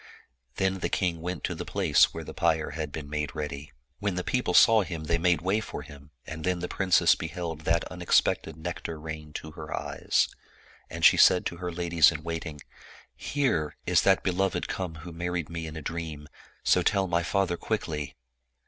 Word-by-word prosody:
Then 95 0 0
the - - -1
king 85 -4 -1
went 90 0 -4
to - - -1
the - - -5
place - - +3
where - - -6
the - - -8
pyre 80 -2 +1
had 75 -1 -4
been 75 -1 -6
made 75 -1 -3
ready. 75 -2 -5 0.3
When 100 -3 -1
the 90 - -2
people 125 -7 0
saw 115 -2 +7
him, 85 -5 -5
they 85 +2 0
made 85 0 +2
way 95 +4 +2
for 110 - -6
him, 70 +1 -13 0.2
and 80 0 -7
then 90 +1 +1
the 90 0 -4
princess 95 -2 +4
beheld 80 -1 -5
that 85 0 +2
unexpected 90 -3 +1
nectar 80 -1 -5
rain 75 -1 -7
to 80 - -6
her 75 0 -9
eyes. - - 0 0.6
And - - -1
she - - +8
said 90 - +6
to 85 - -3
her 90 0 -4
ladies 85 -2 +4
in 75 -2 -6
waiting, 80 -3 -5 0.3
" - - -24 0.2
Here 125 - +1
is - - +4
that 95 -1 +3
beloved 95 +1 0
come 90 -4 -4
who 85 - -7
married 85 -1 -3
me 85 -1 -4
in 80 0 -7
a 80 - -7
dream, 80 -2 -5 0.4
so 90 - +4
tell 95 +2 +2
my 85 -2 +1
father 90 +1 0
quickly." 80 -8 -3
85 Hz, 195 wpm, -28 LUFS, 80-90 Hz, 0.6 s, she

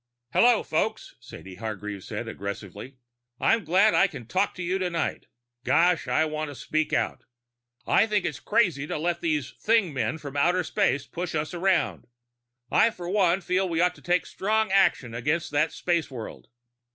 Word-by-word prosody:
_ - - -59 0.3
"Hello, 240 -1 +5
folks," 215 +8 -2
Sadie 95 -6 -11
Hargreave 105 -2 -5
said - - -5
aggressively. 100 +5 -7 0.4
"I'm 225 - +2
glad 190 +6 +4
I 195 - +5
can 135 -10 -9
talk 190 - 0
to 180 - -5
you 185 +2 -1
tonight. 175 -3 -2 0.4
Gosh, 175 +4 +3
I 160 - +2
want 155 -1 -3
to 145 - -8
speak 155 +5 -1
out. - - -1 0.6
I 220 - +4
think 210 -3 0
it's 145 -2 -3
crazy 175 - +1
to - - -3
let 170 +2 -1
these 150 -6 -1
thing 220 -7 +2
men 140 +4 -1
from 145 -3 -9
outer 175 +5 +2
space 165 -9 0
push 175 -1 -5
us 155 +3 -2
around. 185 +1 0 0.6
I - - +5
for 180 -6 -8
one 190 -2 +2
feel 185 +1 0
we 165 -1 -1
ought 180 +1 +3
to - - -18
take 175 +1 +1
strong 215 +1 0
action 190 -11 +2
against 150 +7 -1
that 150 +2 +2
space 170 -3 -1
world." 120 -5 -8
170 Hz, 175 wpm, -26 LUFS, 145-190 Hz, 0.6 s, Hello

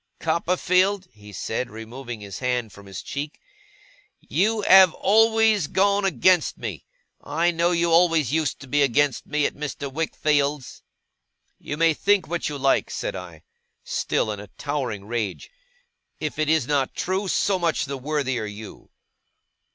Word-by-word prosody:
'Copperfield,' 180 +4 +1
he 105 -1 -14
said, 115 +5 -3
removing 115 +1 -8
his 100 -2 -8
hand 125 -5 -2
from 100 -1 -14
his 95 -1 -7
cheek, 145 +2 -6 0.8
'you 215 +2 0
have 190 -3 +7
always 220 -3 +3
gone 200 +3 +2
against 180 0 +3
me. - - -6 0.4
I 165 +4 +1
know 170 +1 +1
you 170 -1 +1
always 165 -5 +3
used 155 -4 0
to 135 - -10
be 145 +3 +1
against 140 0 +1
me 150 0 0
at - - -1
Mr. 145 -1 -6
Wickfield's.' 150 -3 -1 0.8
'You 145 - -5
may 165 0 +4
think 200 +3 +2
what 170 -1 -2
you 145 - -5
like,' 135 0 +2
said - - -4
I, 85 -4 -9 0.4
still 110 - -1
in 105 - -5
a 105 - -9
towering 130 -9 -3
rage. 110 - -4 0.7
'If 155 0 -4
it 155 -1 +1
is 160 -5 +3
not 140 -1 0
true, 190 +2 -1
so 190 0 +1
much 170 -3 0
the 140 0 -5
worthier 135 -4 -2
you. 105 +1 -10
150 Hz, 150 wpm, -24 LUFS, 125-175 Hz, 0.8 s, have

